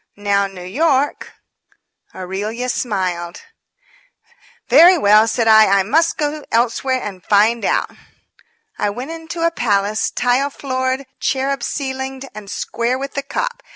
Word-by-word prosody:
Now, 200 -1 +1
New 190 -2 -11
York 280 - 0 0.4
" - - -36
Aurelia 210 +7 -4
smiled. 180 -8 -3 1.2
"Very 355 +2 +7
well," 215 -4 +5
said 225 0 0
I, 220 -1 +7
"I 195 0 +3
must 320 - +1
go 300 0 -2
elsewhere 250 +3 +1
and 195 -6 -7
find 215 +3 +2
out." - - 0 0.9
I 205 - +1
went 250 +9 -6
into 330 0 -4
a 335 - +2
palace, 210 -6 0
tile 250 +3 +1
floored, 260 -1 -3
cherub 275 +1 -1
ceilinged 265 -1 -4
and 210 -1 -10
square 235 +4 -2
with 275 +1 -6
the 280 - -2
cop. - - -4
245 Hz, 135 wpm, -18 LUFS, 205-275 Hz, 1.2 s, Very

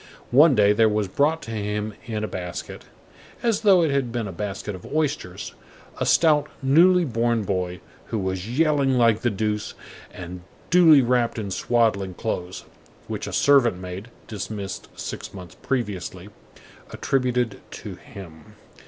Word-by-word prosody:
One 145 +3 +6
day, 105 -1 +5
there 110 +1 +4
was 105 -1 0
brought 150 - +1
to 115 - -7
him 105 0 -3
in 110 -2 -3
a - - -1
basket, 90 -3 -6 0.6
as 230 -3 +1
though 195 -5 +5
it 155 - +1
had 135 -4 0
been 115 -3 -2
a - - -6
basket 100 +3 -5
of 95 - -10
oysters, 150 -12 -2 0.5
a - - 0
stout, 150 -3 +4
newly 175 +6 +5
born 115 -3 0
boy, 90 -2 -2 0.2
who 115 - -3
was 95 0 -3
yelling 145 -5 +3
like 115 -2 +3
the 120 - +2
deuce, 105 0 -2 0.4
and 90 0 -8 0.3
duly 165 -6 +7
wrapped 120 -1 +1
in 100 -3 -4
swaddling 100 -3 +1
clothes, 90 -4 -4 0.4
which - - -4
a - - -5
servant 130 -9 +4
maid, 90 +4 -7 0.2
dismissed 100 -2 -6
six - - -6
months 90 -3 -10
previously, 100 -7 -3 0.6
attributed 125 -4 -1
to - - -8
him. 80 -5 -13
110 Hz, 150 wpm, -24 LUFS, 95-135 Hz, 0.6 s, duly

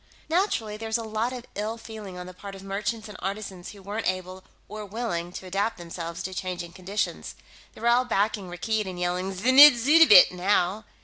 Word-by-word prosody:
Naturally, 315 - 0
there's 220 +1 -2
a 230 - -5
lot 220 +2 -2
of 250 -1 -7
ill 215 +3 -4
feeling 215 -5 -9
on 180 - -7
the 185 - -10
part 195 +2 -10
of 195 - -11
merchants 210 +3 -3
and 210 - -11
artisans 195 -2 -5
who 200 -2 -13
weren't 205 +3 -4
able 185 0 -5 0.2
or 215 +1 -7
willing 195 -5 -4
to 190 - -8
adapt 195 +4 -1
themselves 170 -1 -7
to 190 - -5
changing 180 -2 -5
conditions; 195 +3 -4 0.4
they're 225 - -7
all 240 +1 +4
backing 205 -4 -1
Rakkeed 210 +4 -2
and 180 -1 -6
yelling 180 +2 -1
'Znidd 260 +9 +8
suddabit!' 270 - +7
now. 190 +2 0
200 Hz, 185 wpm, -26 LUFS, 185-225 Hz, 0.4 s, Znidd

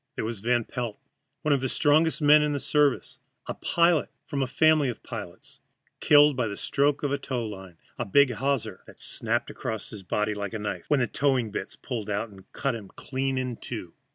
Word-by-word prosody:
There - - -2
was 115 -2 -3
Van 120 +3 +1
Pelt, 120 -2 -4 0.5
one 150 - +3
of 140 - +1
the 130 - -1
strongest 155 +3 +3
men 150 +1 +7
in 150 -1 +1
the 145 - -1
service 145 -1 +1 0.3
a - - -3
pilot 170 -2 +2 0.2
from 140 - -2
a 130 - +1
family 155 +1 +4
of 120 - -6
pilots - - -9 0.4
killed 145 -1 +6
by 125 -3 0
the 100 - -5
stroke 145 +1 +1
of 145 - 0
a 140 - 0
tow 130 -4 -3
line 95 -5 -9 0.2
a 120 - -1
big 140 +6 +5
hawser 120 -5 -1
that - - -14
snapped - - -1
across 110 -2 -5
his 105 - -8
body 105 +3 -1
like 100 0 -4
a - - -2
knife 105 -4 -4
when 145 -3 +3
the - - +3
towing 130 -5 0
bitts - - -5
pulled 115 -5 -5
out, 105 +2 -1
and 95 -2 -16
cut 135 -3 -1
him 110 -4 -7
clean 135 0 -2
in 125 -2 -2
two. - - -6
130 Hz, 210 wpm, -27 LUFS, 110-145 Hz, 0.5 s, men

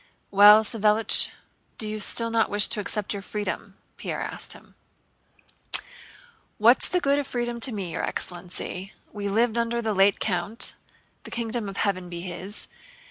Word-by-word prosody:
"Well, 205 +2 +8
Savélich, 215 0 +2 0.5
do 215 - -3
you 215 0 -4
still 230 +2 +1
not 225 -1 +2
wish 205 0 +5
to 215 - -1
accept 210 0 0
your 200 - -5
freedom?" 205 -1 -5 0.2
Pierre - - -4
asked - - -5
him. - - -17 1.8
"What's 235 +4 +5
the 360 - +2
good 280 -3 +2
of 285 - -3
freedom 240 -1 -3
to 250 +2 +2
me, 195 -6 -4
your - - -3
excellency? 180 +2 -2 0.2
We 205 -1 -3
lived 230 +3 +2
under 235 0 0
the 220 -2 -1
late 195 +1 +4
count—the 205 +5 -4
kingdom 230 -2 -2
of 195 - -8
heaven 185 -3 -1
be 170 -1 -5
his! 185 +3 -6
210 Hz, 155 wpm, -25 LUFS, 195-230 Hz, 1.8 s, Well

